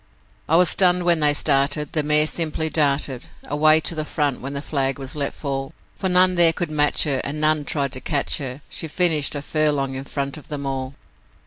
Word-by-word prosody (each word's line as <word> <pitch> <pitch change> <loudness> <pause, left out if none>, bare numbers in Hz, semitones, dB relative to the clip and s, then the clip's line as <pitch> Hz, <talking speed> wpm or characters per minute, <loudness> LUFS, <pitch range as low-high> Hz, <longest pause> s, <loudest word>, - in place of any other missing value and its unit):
'I 160 - +3
was 180 +1 +5
stunned 180 -1 +3
when 170 -2 +3
they 150 -1 +4
started, 145 +1 0
the 155 - +1
mare 150 +1 +3
simply 160 -1 -2
darted 140 -4 0 0.2
Away 155 +2 +4
to 165 - 0
the 155 -1 -3
front 145 -3 -2
when 135 +2 -6
the 140 - -3
flag 135 -3 -1
was 135 0 -6
let 140 -2 -2
fall, 135 0 -5 0.2
For 190 - -2
none 185 0 +4
there 170 -2 +5
could 170 -1 -4
match 150 -1 +2
her, 140 -4 0
and 150 +2 -4
none 155 -1 +1
tried 140 -3 -2
to 130 - -5
catch 145 -1 -1
her 135 0 -6
She 160 - -6
finished 155 -4 +1
a 145 - -5
furlong 145 -3 0
in 135 +1 -6
front 140 +1 -4
of 150 - -13
them 145 -2 -5
all. 135 0 -4
150 Hz, 215 wpm, -21 LUFS, 140-160 Hz, 0.2 s, was